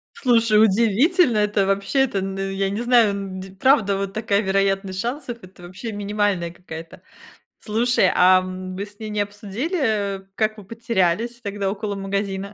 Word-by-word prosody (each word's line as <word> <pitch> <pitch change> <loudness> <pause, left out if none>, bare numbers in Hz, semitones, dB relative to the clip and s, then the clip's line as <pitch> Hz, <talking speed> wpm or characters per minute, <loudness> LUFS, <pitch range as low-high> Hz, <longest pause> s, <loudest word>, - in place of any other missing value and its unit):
Слушай, 230 -4 +3
удивительно 235 - +3
это 210 -1 +2
вообще! 195 +7 0
Это, 205 -7 -1
ну, 195 0 -4
я 195 0 -1
не 205 +3 -3
знаю, 240 -4 +4
ну, 195 -1 -6
де 190 0 -10
правда 205 -1 +3
вот 195 0 -3
такая 215 -2 0
вероятность 195 -1 0
шансов, 240 +2 -4
это 185 -2 -15
вообще 185 +6 -7
минимальная 205 -4 -1
какая-то. 165 -2 -10 0.6
Слушай, 225 -2 +2
а 185 +1 +6
вы 185 +1 -6
с 205 0 -17
ней 215 -1 -6
не 210 0 -3
обсудили, 205 - -2
как 215 +1 0
вы 210 - -10
потерялись 230 +1 -1
тогда 200 -2 -3
около 205 +1 -3
магазина? 195 0 -3
200 Hz, 160 wpm, -22 LUFS, 195-225 Hz, 0.6 s, а